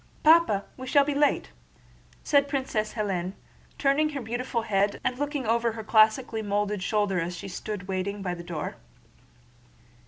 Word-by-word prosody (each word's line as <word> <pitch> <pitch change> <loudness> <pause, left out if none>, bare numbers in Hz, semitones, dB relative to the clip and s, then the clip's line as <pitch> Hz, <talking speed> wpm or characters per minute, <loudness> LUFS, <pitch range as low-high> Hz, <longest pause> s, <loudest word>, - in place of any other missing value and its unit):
"Papa, 310 -11 +5
we 260 0 -7
shall 280 +2 +4
be 295 - -1
late," 290 +1 +1 0.7
said 285 -2 +3
Princess 260 -6 -2
Hélène, 190 -4 -2 0.4
turning 285 +2 +2
her 285 -3 -5
beautiful 240 +1 -2
head 200 -2 +1
and 255 0 -1
looking 290 -2 -2
over 230 +1 +1
her 220 -1 -6
classically 220 +1 +3
molded 205 -1 -1
shoulder 205 -2 +1
as 170 +2 -3
she - - -7
stood 195 0 -6
waiting 195 +1 -3
by 180 -2 -2
the 170 -1 -7
door. 165 -3 -5
220 Hz, 155 wpm, -27 LUFS, 200-265 Hz, 0.7 s, Papa